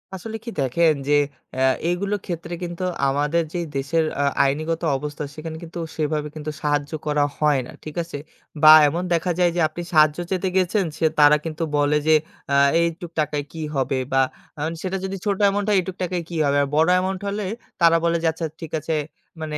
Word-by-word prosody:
আসলে 220 +4 -6
কি - - -4
দেখেন, 155 +5 +3
যে 145 - +3 0.4
আ - - -1 0.3
এইগুলোর 200 +4 -1
ক্ষেত্রে 170 -1 -5
কিন্তু 175 +1 -5 0.2
আমাদের 145 +5 +1
যে 175 - -2 0.2
দেশের 150 +4 +1 0.2
আ - - +2 0.2
আইনগত 155 +4 -1 0.2
অবস্থা 150 +1 -5
সেখানে 160 0 -6
কিন্তু 170 +1 -8 0.2
সেভাবে 150 -1 -1
কিন্তু 155 0 -5
সাহায্য 145 -1 0 0.2
করা 150 -1 +2
হয় 150 -2 +3
না। - - -10
ঠিক 155 - -8
আছে? 165 -3 -7 0.5
বা 155 - +11 0.2
এমন 170 +5 -1
দেখা 170 +2 +1
যায় 175 -1 +4
যে - - 0
আপনি 165 +2 -7
সাহায্য 155 -1 +5
চেতে 190 0 0
গেছেন 190 +2 +2
সে 165 - +1
তারা 150 0 +7
কিন্তু 160 0 -3
বলে 145 +1 +3
যে, 160 - +6 0.4
আ - - +4 0.3
"এইটুক 170 +1 -2
টাকায় 150 -1 0
কি 165 - -7
হবে?" 135 0 0 0.2
বা 135 - +5 0.4
আ - - -4 0.2
সেটা 190 0 -2
যদি 190 0 -4
ছোট 200 -2 +1
অ্যামাউন্ট 200 0 +2
হয়, 205 - +4
"এইটুক 185 0 -5
টাকায় 180 -1 -2
কি 170 - -6
হবে?" 140 0 +2
আর - - -1
বড় 160 +3 +4
অ্যামাউন্ট 185 +1 -1
হলে 200 0 -2 0.4
তারা 165 0 +6
বলে 170 0 +2
যে, - - +3
"আচ্ছা, 160 +1 -4 0.2
ঠিক 165 - -7
আছে।" 155 +2 -2 0.5
মানে 155 -1 -3
165 Hz, 200 wpm, -22 LUFS, 150-175 Hz, 0.5 s, বা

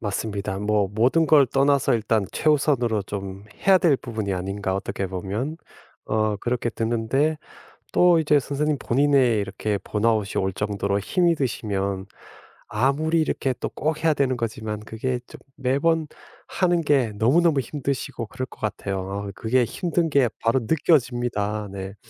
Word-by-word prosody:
맞습니다. 100 -2 -3
뭐 105 -1 +1
'모든 130 +9 +3
걸 145 -2 +6
떠나서 140 0 +2
일단 110 -2 +1
최우선으로 135 -8 +1
좀 95 0 -6 0.2
해야 190 -1 +7
될 165 -7 +3
부분이 110 -5 -4
아닌가, 95 +1 -2
어떻게 95 0 -3
보면.' 100 - -4 0.5
어 110 -1 +1
그렇게 120 +2 -2
드는데 120 +8 0 0.6
또 175 -1 +5
이제 150 -2 +3
선생님 145 +2 -1
본인의 130 -3 +3
이렇게 100 +1 -2
번아웃이 105 -2 0
올 95 - -1
정도로 100 0 -1
힘이 170 - +2
드시면 100 -7 -2 0.6
아무리 145 +8 +1
이렇게 135 -4 -1
또 - - -2
꼭 155 +2 -2
해야 160 - +5
되는 135 -3 +1
거지만 110 -2 -4
그게 115 +4 -3
좀 - - -12 0.2
매번 150 +5 +1 0.4
하는 175 -2 +1
게 135 -8 +2
너무너무 145 +7 +3
힘드시고 135 -2 -4
그럴 130 +4 -5
것 - - -17
같아요. 100 -1 -3
그게 125 +2 +1
힘든 170 - -1
게 140 -4 +4
바로 115 +3 +2
느껴집니다. 120 -7 0
네. 95 0 -6
120 Hz, 310 characters per minute, -24 LUFS, 105-145 Hz, 0.6 s, 해야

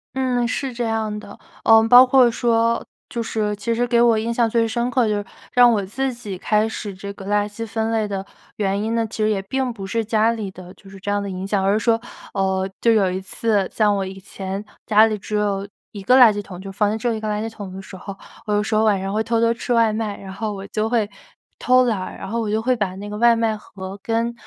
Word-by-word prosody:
嗯， 250 -2 +1
是 260 +3 -3
这 240 0 -3
样 220 -2 -1
的。 200 -1 -12 0.3
嗯， 225 0 +6
包 245 +2 +9
括 255 -1 +5
说 230 0 +1 0.3
就 235 - -3
是， 215 -2 -1
其 205 +3 -2
实 240 +1 +1
给 235 -1 +2
我 235 -2 +5
印 225 +2 -1
象 235 -1 +2
最 230 0 +2
深 235 +2 -1
刻 250 -2 +2
就 210 - +1
是， 205 - -4 0.3
让 245 -1 +7
我 205 -4 0
自 265 +7 -2
己 235 -5 -7
开 210 +3 +1
始 215 -2 -5
这 200 +1 -7
个 195 - -11
垃 205 0 +1
圾 210 +2 -6
分 225 +1 -2
类 220 -2 0
的 195 -1 -4 0.3
原 200 -1 -1
因 225 +2 -1
呢， 230 -1 +1
其 220 - -9
实 215 - +2
也 210 -2 +1
并 260 +5 -2
不 200 -4 -7
是 225 +4 -1
家 220 +1 +2
里 220 -4 -4
的 185 -1 -12
就 195 - -17
是 195 0 -12
这 205 +2 -3
样 205 0 0
的 200 - -4
影 185 0 -5
响。 200 -1 0
而 195 +1 +3
是 215 - +2
说， 225 +1 +2 0.3
呃， 190 -1 0
就 230 - +4
有 200 -4 +3
一 185 +1 -3
次 200 0 0
像 210 -2 +2
我 195 - -1
以 190 0 -8
前 195 +1 -6 0.2
家 215 0 +6
里 220 -1 0
只 210 +1 -5
有 200 -1 0 0.2
一 205 - -8
个 250 +6 +4
垃 240 -4 +8
圾 205 - -3
桶， 185 -3 -10
就 195 +1 -8
房 205 +1 +1
间 215 - -1
只 225 - -3
有 235 - +1
一 220 - -3
个 215 - -4
垃 210 0 -1
圾 - - -2
桶 205 -4 -8
的 190 - -8
时 190 - -11
候， 195 +1 -8 0.3
我 210 - 0
有 205 0 +2
时 215 - -3
候 215 0 +3
晚 210 -3 +3
上 195 +1 -3
会 215 +1 +1
偷 230 0 0
偷 230 0 +3
吃 240 +1 -3
外 225 -2 +3
卖。 215 -2 -3
然 190 -1 -9
后 215 +1 -3
我 195 -1 -7
就 215 +1 -1
会 225 -3 +1 0.5
偷 255 0 +4
懒 225 -5 0
儿， 185 - -6
然 - - -7
后 230 +4 -2
我 220 - -2
就 215 +1 +1
会 255 +1 +2
把 200 -5 -2
那 200 +2 -7
个 205 - -6
外 235 0 +6
卖 225 -1 0
盒 195 -1 -9
跟 230 +2 -1
215 Hz, 295 characters per minute, -21 LUFS, 200-230 Hz, 0.5 s, 包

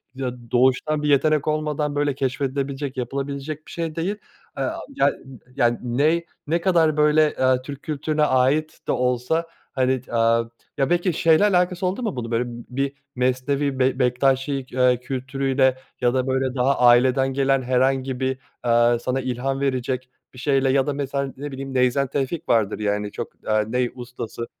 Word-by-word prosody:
ya 130 -1 -2 0.2
doğuştan 130 +4 +2
bir 150 - +1
yetenek 150 +1 +3
olmadan 150 -1 -1
böyle 145 -1 0
keşfedilebilecek 135 +1 -2
yapılabilecek 140 +4 -4
bir - - -11
şey 165 -2 -4
değil. 175 +5 -1 0.4
Aaa, - - -2 0.2
yan - - +3 0.4
yani 120 -3 +2
ney 150 +8 +1 0.2
ne 165 +3 +1
kadar 165 -4 +3
böyle, 150 0 +4
aaa, 130 -1 +3
Türk 140 +1 -9
kültürüne 155 0 -1
ait 145 +3 +2
de - - +1
olsa 125 +6 0 0.3
hani, 130 -1 +1
eee, 115 -2 +1 0.3
ya 135 0 +1
belki 175 +1 +1
şeyle 160 +3 +4
alakası 180 -2 +2
oldu 190 +7 -1
mu 215 -5 -2
bunun? 120 -2 -5
Böyle 120 +1 +1
b - - -7 0.2
bir 135 +1 0 0.2
Mesnevi 130 +2 0
Bek 130 0 +2
Bektaşi, 135 +2 +1
ııı, 125 -1 +3
kültürüyle 130 +1 0 0.2
ya 120 -1 +3
da 130 0 0
böyle 130 0 0
daha 135 +2 +2
aileden 130 +2 +4
gelen 135 0 +2
herhangi 130 +1 +1
bir, 130 0 -1 0.2
aaa, 120 0 +3
sana 130 +2 -1
ilham 130 +2 -2
verecek 130 -1 -2 0.2
bir 125 - -12
şeyle 135 0 +2
ya 135 +1 +2
da 145 - 0
mesela 140 -1 -3
ne 145 +2 -6
bileyim 135 0 -6
Neyzen 130 +2 +2
Tevfik 140 +5 -3
vardır 110 -3 +2
yani 105 0 -1
çok, - - -6
aaa, 110 0 +3
ney 125 +2 0
ustası. 120 -1 -6
135 Hz, 165 wpm, -23 LUFS, 125-145 Hz, 0.4 s, böyle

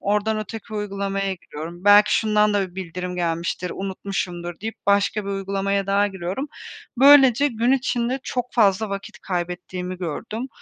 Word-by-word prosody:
Oradan 210 +2 0
öteki 215 +1 -7
uygulamaya 195 -1 -2
giriyorum. 170 +1 -9
Belki 205 +1 +7
şundan 210 -1 +2
da 195 -2 0
bir - - -23
bildirim 180 0 -5
gelmiştir, 170 +1 -2
unutmuşumdur 185 -3 -4
deyip 225 +2 -4
başka 200 +1 +2
bir 200 - -4
uygulamaya 195 0 -1
daha 200 +1 +3
giriyorum. 190 - -4 0.5
Böylece 275 -1 +7
gün 235 0 +1
içinde 255 -1 0
çok 250 -1 -3
fazla 215 -2 +3
vakit 200 +2 -6
kaybettiğimi 180 0 -4
gördüm. 215 - -4
200 Hz, 140 wpm, -23 LUFS, 185-220 Hz, 0.5 s, Belki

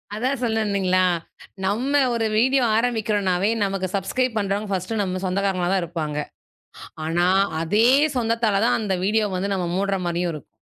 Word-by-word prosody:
அதான் 255 +4 -1
சொல்ல 225 -3 0
வந்தீங்களா, 185 -3 +1 0.6
நம்ம 255 +9 +1
ஒரு 230 -1 0
வீடியோ 260 +2 +3
ஆரம்பிக்கிறனாவே 210 -5 0
நமக்கு 195 -1 -1
சுப்ஸ்கரைப் 230 +5 -1
பண்றவங்க 200 0 -1
ஃபர்ஸ்ட் 185 +2 -2
நம்ம 185 -1 -2
சொந்தக்காரங்களாதான் 190 0 0
இருப்பாங்க. 160 -3 -4 0.9
ஆனா, 175 +2 +1 0.3
அதே 210 +8 +3 0.3
சொந்தத்தால 225 -4 +1
தான் - - +3
அந்த 205 -4 -1
வீடியோ 215 +1 +2
வந்து 195 +2 -1
நம்ம 180 -2 -2
மூடுற 195 +1 0
மாரியும் 175 0 -1
இருக்கும். 150 -4 -10
200 Hz, 140 wpm, -23 LUFS, 185-225 Hz, 0.9 s, வீடியோ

